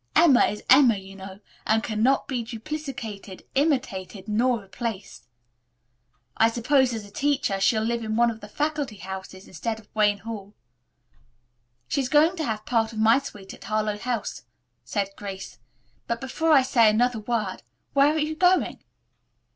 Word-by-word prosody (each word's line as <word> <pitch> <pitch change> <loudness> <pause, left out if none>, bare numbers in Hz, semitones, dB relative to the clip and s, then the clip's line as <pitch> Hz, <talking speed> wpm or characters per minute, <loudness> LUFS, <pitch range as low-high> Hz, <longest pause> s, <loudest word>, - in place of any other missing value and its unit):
Emma 315 -7 +6
is 210 - -5
Emma, 255 -4 +6
you 195 0 -11
know, 190 0 -10 0.3
and 220 0 +2
cannot 230 +5 +1
be 255 -4 -2
duplicated, 225 -5 -7
imitated 235 - -1
nor 235 +3 +2
replaced. 195 - -6 1.1
I 225 - +4
suppose, 255 +3 +2
as 220 -3 -5
a 200 - -15
teacher, 280 -6 0
she'll 220 +2 +2
live 235 +1 -1
in 220 0 -2
one 235 +1 +3
of 220 - -9
the 210 - -9
faculty 290 0 -2
houses, 190 0 -8
instead 220 +5 -4
of 215 - -18
Wayne 210 -1 +3
Hall." 210 -1 -8 1.3
"She 280 - 0
is 255 - -3
going 315 +4 +4
to 320 - -2
have 215 -3 -3
part 225 -2 +1
of 220 - -9
my 225 +4 +5
suite 205 -8 -10
at - - -13
Harlowe 215 -1 -1
House," 240 -2 -3 0.4
said 200 -1 -2
Grace. 195 -1 -8 0.5
"But, 235 0 -2
before 320 +6 -1
I 275 -4 +7
say 235 -4 +4
another 235 +2 +2
word, 215 -3 -2 0.4
where 280 +1 +5
are 310 - 0
you 310 +1 -1
going?" 360 +2 +2
225 Hz, 165 wpm, -25 LUFS, 210-265 Hz, 1.3 s, I